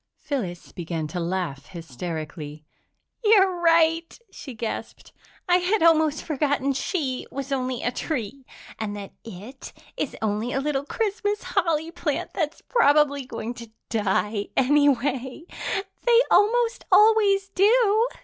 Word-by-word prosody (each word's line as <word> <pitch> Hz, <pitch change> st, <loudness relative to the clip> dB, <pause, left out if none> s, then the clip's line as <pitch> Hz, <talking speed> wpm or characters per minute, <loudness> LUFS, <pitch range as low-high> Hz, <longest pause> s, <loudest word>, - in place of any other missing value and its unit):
Phyllis 190 Hz, -, -5 dB
began 165 Hz, -2 st, -4 dB
to 180 Hz, -, -4 dB
laugh 170 Hz, -5 st, -3 dB
hysterically. 155 Hz, -1 st, -7 dB, 0.6 s
"You're 385 Hz, -5 st, +4 dB
right!" 330 Hz, 0 st, +3 dB
she 265 Hz, -4 st, -9 dB
gasped. 220 Hz, 0 st, -6 dB, 0.3 s
"I 355 Hz, 0 st, +5 dB
had 365 Hz, +2 st, +1 dB
almost 315 Hz, -2 st, +3 dB
forgotten 285 Hz, -2 st, 0 dB
she 270 Hz, -3 st, -2 dB
was 275 Hz, 0 st, -6 dB
only 255 Hz, -2 st, -2 dB
a 245 Hz, -, 0 dB
tree. 265 Hz, -1 st, -4 dB, 0.4 s
And 210 Hz, -2 st, -3 dB
that 200 Hz, -1 st, -8 dB
it 225 Hz, +5 st, -10 dB, 0.3 s
is 295 Hz, -, -3 dB
only 220 Hz, +2 st, -2 dB
a 270 Hz, -, 0 dB
little 280 Hz, 0 st, -1 dB
Christmas 415 Hz, +2 st, -2 dB
holly 325 Hz, -1 st, 0 dB
plant -, -, -3 dB
that's 315 Hz, -3 st, -3 dB
probably 290 Hz, -, +3 dB
going 235 Hz, -2 st, -5 dB
to 235 Hz, -2 st, -11 dB, 0.2 s
die, 210 Hz, -1 st, 0 dB
anyway 270 Hz, 0 st, +2 dB, 0.6 s
they 475 Hz, 0 st, +6 dB
almost 470 Hz, +3 st, +3 dB
always 415 Hz, -3 st, +5 dB
do." 435 Hz, +3 st, +3 dB
275 Hz, 125 wpm, -24 LUFS, 220-355 Hz, 0.6 s, they